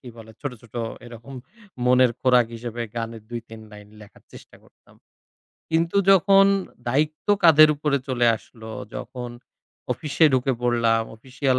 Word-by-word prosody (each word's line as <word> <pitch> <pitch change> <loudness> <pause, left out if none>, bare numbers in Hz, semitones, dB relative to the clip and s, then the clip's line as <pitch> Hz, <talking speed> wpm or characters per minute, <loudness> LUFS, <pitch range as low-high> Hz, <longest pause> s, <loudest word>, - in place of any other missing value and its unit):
কি 125 - -12
বলে 110 -1 -13
ছোট, 145 - -4
ছোট 115 0 -20 0.3
এরকম 120 +3 -11 0.5
মনের 125 0 +4
খোরাক 125 -2 +4
হিসেবে 120 0 -6
গানের 115 -1 -5
২ 120 - -4
৩ 115 0 -11
লাইন 105 -1 -13
লেখার 105 - -17
চেষ্টা - - -15
করতাম। - - -25 0.8
কিন্তু 165 +3 0
যখন 195 +1 +6 0.4
দায়িত্ব 150 +4 -1 0.2
কাঁধের 155 -2 +7
উপরে 150 -1 0
চলে 120 -2 +1
আসলো, 110 0 -13 0.2
যখন 125 -2 -7 0.6
অফিসে 155 +2 0
ঢুকে 130 +1 +1
পড়লাম, 115 -2 +2
অফিশিয়াল 130 +2 -1
125 Hz, 140 wpm, -23 LUFS, 115-145 Hz, 0.8 s, কাঁধের